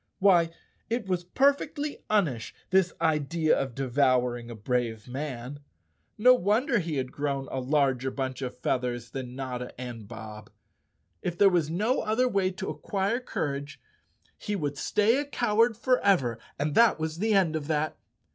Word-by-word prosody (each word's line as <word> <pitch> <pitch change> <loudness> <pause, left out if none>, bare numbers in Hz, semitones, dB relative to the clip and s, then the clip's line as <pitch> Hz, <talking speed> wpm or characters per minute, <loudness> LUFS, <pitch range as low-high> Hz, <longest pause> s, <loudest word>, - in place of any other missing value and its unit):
Why 180 -4 +5 0.4
it 230 -1 -1
was 180 -2 -1
perfectly 285 - +1
unish, 155 - 0 0.2
this 185 -2 +4
idea 160 0 +2
of 135 -3 -3
devouring 125 -3 +1
a 120 - -7
brave 115 0 -2
man. 130 0 -5 0.6
No 250 +4 +7
wonder 235 - +2
he 165 -4 -3
had 130 -2 -2
grown 140 -2 -2
a 135 - -2
larger 135 -1 +1
bunch 130 -1 -4
of 125 -1 -5
feathers 125 -2 -2
than 125 -2 -6
Notta 125 -2 -5
and 120 -4 -7
Bob! 110 -2 -9 0.7
If 175 -1 -3
there 200 0 +6
was 170 -4 +1
no 215 +10 +1
other 225 +4 +1
way 195 -5 +1
to 185 - -5
acquire 195 +8 -1
courage, 145 - -4 0.6
he 210 - -3
would 145 -6 -2
stay 215 - +2
a 290 - -2
coward 230 -4 +2
forever 195 - +2 0.2
and 145 +1 -1
that 230 +4 +5
was 160 +1 -3
the 215 +1 +2
end 175 -5 +3
of 150 -2 -3
that! 155 -1 0
150 Hz, 155 wpm, -28 LUFS, 130-200 Hz, 0.7 s, No